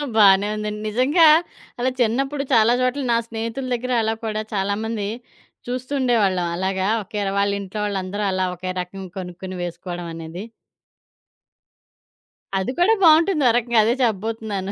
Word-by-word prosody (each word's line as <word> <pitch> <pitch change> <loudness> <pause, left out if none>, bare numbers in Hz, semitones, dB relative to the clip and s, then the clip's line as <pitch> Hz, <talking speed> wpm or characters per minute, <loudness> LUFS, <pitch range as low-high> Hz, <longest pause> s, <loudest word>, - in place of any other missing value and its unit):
బానే 200 -1 +6
ఉందండి. 210 0 -4
నిజంగా 280 - +4 0.5
అలా 255 +2 +1
చిన్నప్పుడు 270 +5 0
చాలా 230 +1 +5
చోట్ల 255 +3 0
నా 230 - +4
స్నేహితుల 230 +3 -4
దగ్గర 255 +2 -4
అలా 220 0 0
కూడా, 215 -1 -2
చాలామంది 205 +2 -2 0.6
చూస్తూ 255 +3 -4
ఉండేవాళ్ళం. 205 -8 +2
అలాగా 190 +1 -1 0.2
ఒకే 205 +1 -4
వాళ్లీంట్లో 200 0 -1
వాళ్ళందరూ 200 0 -3
అలా 185 0 0
ఒకే 185 +1 -5
రకంగా 185 +1 -8
కొనుక్కొని 185 +1 -7
వేసుకోవడం 175 0 -6
అనేది. 165 +4 -7 2.1
అది 190 +7 -1
కూడా 410 +6 +5
బావుంటుంది 320 -1 +5
ఓరకంగా 235 -1 +2
అదే 230 +2 +2
చెప్పబోతున్నాను. 215 -3 -2
215 Hz, 125 wpm, -22 LUFS, 190-240 Hz, 2.1 s, బానే